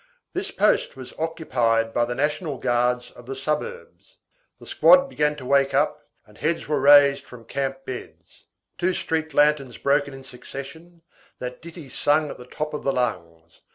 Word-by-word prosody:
This 380 +3 -3
post 210 - +1
was 130 -1 -10
occupied 120 -9 0
by 120 - +2
the 120 +1 -4
National 150 +1 -1
Guards 125 0 0
of 120 - -15
the 135 - -5
suburbs. 155 - -5 0.4
The - - -13
squad 275 0 +5
began 150 - 0
to 130 - -10
wake 140 0 +2
up, 150 +1 0 0.2
and 105 -1 -20
heads 165 +2 -1
were 150 - +1
raised 140 0 +6
from 120 -2 -13
camp 135 +2 -3
beds. 130 - -10 0.3
Two 180 +1 +1
street 160 -3 -2
lanterns 145 -4 +2
broken 140 0 +1
in 135 - -11
succession, 160 +6 -10 0.3
that 125 0 -7
ditty 165 -3 -10
sung 145 +3 +1
at - - -10
the 125 - -11
top 150 +3 -4
of 150 - -4
the 135 - +1
lungs. 85 -10 -4
140 Hz, 170 wpm, -24 LUFS, 125-155 Hz, 0.4 s, raised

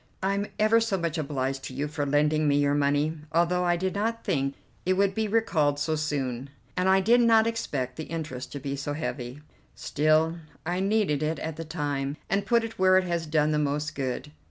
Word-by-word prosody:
I'm 200 +1 0
ever 220 +2 +4
so 225 -4 0
much 170 -2 -2
obliged 135 -2 -2
to 130 - -7
you 145 +3 -1
for 145 -1 -3
lending 150 +2 +2
me 145 0 +3
your 145 0 +2
money, 145 +2 +1
although 175 +2 +2
I 175 0 +3
did 185 +1 -1
not 225 +3 -1
think 135 -1 0 0.3
it 185 - +2
would 195 +1 +2
be 220 +1 -1
recalled 185 -10 +2
so 155 +2 0
soon, 140 -4 -2 0.3
and 185 +1 +2
I 190 0 +5
did 235 +5 +5
not 225 -1 +5
expect 140 - -2
the 160 - -5
interest 155 -5 -5
to 140 - -4
be 140 0 -3
so 140 +1 -3
heavy. 140 -3 -5 0.3
Still, 155 +2 +2 0.3
I 175 +2 -1
needed 195 -7 +1
it 155 +1 0
at 160 -1 -4
the 165 +1 -6
time, 145 -3 -3
and 200 0 +1
put 235 -1 +3
it 225 -3 -7
where 185 0 +6
it 190 - +3
has 170 -2 -2
done 155 0 +2
the 150 - +1
most 150 +1 -1
good. 130 - -3
155 Hz, 210 wpm, -27 LUFS, 145-190 Hz, 0.3 s, where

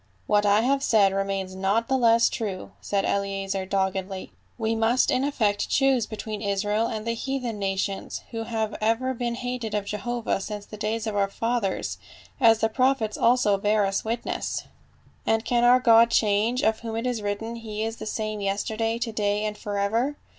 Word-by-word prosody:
"What 210 0 +2
I 205 +2 +5
have 275 +3 +1
said 205 -7 +4
remains 195 -1 -2
not 195 +5 0
the 265 - +1
less 230 -2 +5
true," 200 -5 -4
said 200 -1 0
Eleazer 195 -1 -1
doggedly. 190 0 -2
" - - -38
We 225 -1 0
must 225 +3 +2
in 255 +1 +1
effect 220 -8 0
choose 270 -4 +2
be 215 - -6
tween 215 -1 -5
Israel 205 +2 0
and 215 -1 -4
the 230 - 0
heathen 245 -2 -3
nations, 195 0 -2
who 225 -1 -4
have 220 -2 -2
ever 230 +4 +1
been 240 -1 -2
hated 245 -3 -4
of 205 -1 -1
Jehovah 220 +1 -2
since 205 0 -6
the 215 - -10
days 215 +2 -2
of 215 -2 -3
our 200 -1 +2
fathers, 230 -2 -2 0.4
as 225 -3 +5
the 225 - +4
prophets 255 -2 +1
also 230 -5 +3
bear 210 0 +2
us 195 0 -1
witness; 230 +2 -3 0.6
and 225 0 +2
can 240 -1 +2
our 245 +1 +6
God 230 -2 +6
change, 220 +3 +2
of 220 0 +2
whom 225 -1 -5
it 230 +2 -2
is 245 -3 -1
written, 210 +3 -3
he 215 -2 -5
is 225 +1 -3
the - - -7
same 215 -1 -3
yester 200 +2 -1
day, 225 +1 0
to 235 -1 -3
day 210 -1 0
and 210 0 -2
forever?" 210 +8 -1
220 Hz, 190 wpm, -25 LUFS, 205-235 Hz, 0.6 s, our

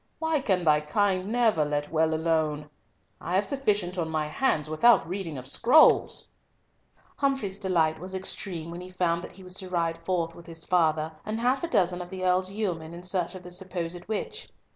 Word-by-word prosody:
Why 320 -1 0
can 190 -8 +1
thy 150 -2 +4
kind 185 +4 +1
never 225 -9 +3
let 145 0 -2
well 160 0 +2
alone? 155 -2 0 0.5
I 175 - -2
have 195 +2 +3
sufficient 205 -10 0
on 160 -1 -1
my 155 -1 -1
hands 155 - +1
without 170 +5 +4
reading 175 -4 -4
of 130 0 -7
scrolls!" 250 - +4 0.9
Humfrey's 270 -9 -1
delight 165 -5 +1
was 185 +3 -7
extreme 180 -3 -4
when 175 +1 -7
he 180 - -9
found 175 -2 0
that - - -9
he 190 +1 -13
was 180 0 -7
to 185 - -6
ride 165 -2 -1
forth 170 -2 -1
with 170 0 -14
his 165 -1 -7
father, 160 -3 +2
and 215 +1 -3
half 255 +4 +1
a - - 0
dozen 180 - +1
of 175 - -8
the 185 -1 -4
earl's 185 +1 +2
yeomen, 175 -6 -3
in 175 - -10
search 180 0 -1
of 185 - -9
the 180 - -10
supposed 175 -1 -4
witch. 325 - -4
180 Hz, 195 wpm, -27 LUFS, 165-195 Hz, 0.9 s, thy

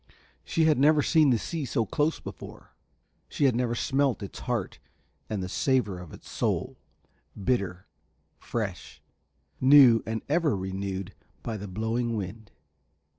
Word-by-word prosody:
She 165 - 0
had 155 -4 +3
never 150 +1 +5
seen 155 -4 +4
the 120 - +4
sea 160 +7 -4
so 115 -3 0
close 150 +10 0
before, - - -10 0.6
she 145 - 0
had 130 -4 +3
never 120 -1 0
smelt 135 -2 0
its 100 - -8
heart 120 -6 -3 0.5
and 105 -3 -2
the - - -3
savour 105 -3 0
of 90 -3 -10
its - - -13
soul; - - -2 0.6
bitter, 95 -5 -1 0.5
fresh, - - -5 0.6
new 130 -4 +7
and 110 0 -3
ever 150 - +1
renewed 95 0 -4 0.3
by 115 - -3
the 105 -1 -6
blowing 115 +4 -2
wind. 105 +2 -6
115 Hz, 140 wpm, -27 LUFS, 100-140 Hz, 0.6 s, new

